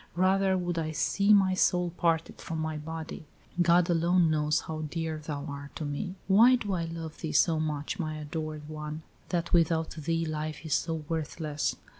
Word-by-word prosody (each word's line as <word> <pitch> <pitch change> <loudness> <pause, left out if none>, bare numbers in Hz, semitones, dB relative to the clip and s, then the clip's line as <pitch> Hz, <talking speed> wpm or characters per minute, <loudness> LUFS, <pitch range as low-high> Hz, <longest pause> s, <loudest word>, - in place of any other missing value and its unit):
Rather 190 +1 +3
would 175 -2 -1
I 155 -1 -2
see 200 +6 +2
my 195 -2 +6
soul 180 -1 +2
parted 165 -2 0
from 165 - -4
my 160 0 -2
body. 160 0 -6 0.3
God 175 0 +5
alone 170 -1 +3
knows 150 0 +2
how 155 -1 -5
dear 160 -1 -3
thou 145 -2 -4
art 140 -1 -7
to 155 - -4
me. 160 +6 -3
Why 225 +6 +7
do 205 -5 -2
I 170 -2 -1
love 165 -1 -7
thee 160 - -3
so 165 -2 +4
much, 155 +4 -2
my 155 -2 -2
adored 155 0 -5
one, 155 0 -6 0.3
that 170 -2 -1
without 165 -1 +3
thee 165 +1 -1
life 155 0 -4
is 155 - -1
so 160 -2 0
worthless? 155 -1 -2
160 Hz, 180 wpm, -29 LUFS, 155-175 Hz, 0.3 s, Why